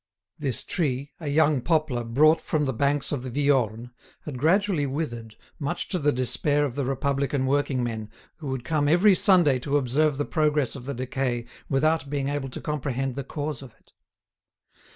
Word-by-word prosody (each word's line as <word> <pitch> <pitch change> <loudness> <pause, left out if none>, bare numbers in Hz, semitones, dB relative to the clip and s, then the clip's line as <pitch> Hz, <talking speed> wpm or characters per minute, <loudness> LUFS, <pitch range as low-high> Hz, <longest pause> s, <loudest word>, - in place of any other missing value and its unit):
This 135 -5 +1
tree, 140 -5 -2
a 160 - -6
young 145 -2 +3
poplar 155 -6 0
brought 155 +8 +4
from 150 -2 0
the 135 - -1
banks 140 +4 0
of 145 -4 -2
the 130 - -6
Viorne, 125 -4 0 0.3
had 135 -5 -6
gradually 170 0 +2
withered, 120 -6 -4 0.2
much 165 +5 -3
to 180 - -1
the 145 -1 +2
despair 135 +4 +1
of 135 - -4
the 140 0 -2
republican 135 0 0
working 135 -2 +1
men, 110 -3 -4 0.3
who 155 - -8
would 130 -2 -3
come 150 +1 0
every 185 +6 +6
Sunday 175 -9 +4
to 140 +3 0
observe 145 +2 +1
the 145 - -1
progress 150 -4 +1
of 130 -1 -9
the 140 - -3
decay 125 -1 -2 0.2
without 150 +1 +1
being 140 -1 -1
able 140 -2 -3
to - - -7
comprehend 135 -3 -2
the 140 +2 -4
cause 145 0 -4
of 125 -5 -12
it. - - -30
140 Hz, 180 wpm, -25 LUFS, 130-150 Hz, 0.3 s, every